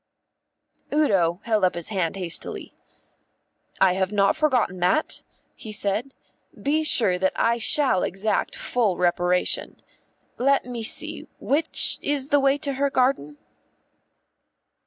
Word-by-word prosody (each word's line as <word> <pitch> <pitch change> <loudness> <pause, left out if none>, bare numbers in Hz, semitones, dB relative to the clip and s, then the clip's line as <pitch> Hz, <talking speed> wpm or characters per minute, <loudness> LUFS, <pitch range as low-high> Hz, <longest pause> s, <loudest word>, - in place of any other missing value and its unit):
Udo 195 - +1
held 215 -3 0
up 180 - +2
his 170 +3 -5
hand 185 -5 -2
hastily. 180 -4 -3 1.1
"I 190 -2 +4
have 190 +1 -1
not 200 +2 +2
forgotten 255 - 0
that," 180 - 0 0.3
he 220 - -10
said. 210 +5 -2 0.4
"Be 305 +3 0
sure 205 -11 +2
that 190 0 0
I 235 +1 +1
shall 255 -5 +2
exact 195 +4 -2
full 220 -7 -1
reparation. 180 0 0 0.6
Let 275 +2 +2
me 245 -2 -6
see; 220 - 0
which 300 +3 +2
is 285 -1 -1
the 290 - +3
way 275 0 +2
to 285 -1 -3
her 280 - +2
garden?" 250 - 0
220 Hz, 125 wpm, -23 LUFS, 185-275 Hz, 1.1 s, I